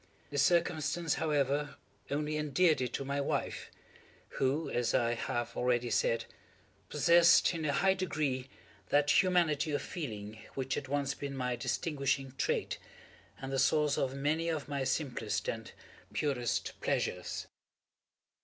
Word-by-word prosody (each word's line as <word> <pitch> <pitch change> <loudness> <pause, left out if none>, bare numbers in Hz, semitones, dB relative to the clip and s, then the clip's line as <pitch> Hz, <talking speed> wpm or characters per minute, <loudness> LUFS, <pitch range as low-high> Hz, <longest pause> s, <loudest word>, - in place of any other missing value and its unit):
This 145 -1 +1
circumstance, 170 0 +2
however, 145 -2 0 0.3
only 150 +2 -1
endeared 155 +1 +2
it 125 - -1
to 135 - -3
my 140 +1 -1
wife, 140 - -2 0.7
who, 140 +4 +1
as 120 -1 0
I 120 -1 +2
have 120 0 -3
already 120 -1 +1
said, 115 0 +1 0.6
possessed, 170 +1 +5
in 165 -2 -3
a 145 - +2
high 190 +6 +3
degree, 145 -8 -2 0.4
that 145 +4 +5
humanity 170 -5 +2
of 145 - 0
feeling 110 - -6 0.2
which 135 0 -2
had 135 - -3
once 140 0 0
been 140 -1 -5
my 125 -1 -1
distinguishing 135 +1 -1
trait, - - 0 0.6
and 135 0 -5
the 135 - 0
source 150 +1 +3
of 135 0 -1
many 155 +4 0
of 155 -3 -2
my 140 -2 -2
simplest 120 -7 -1
and 115 -1 -4 0.4
purest 125 -6 -1
pleasures. - - -1
140 Hz, 135 wpm, -32 LUFS, 130-155 Hz, 0.7 s, possessed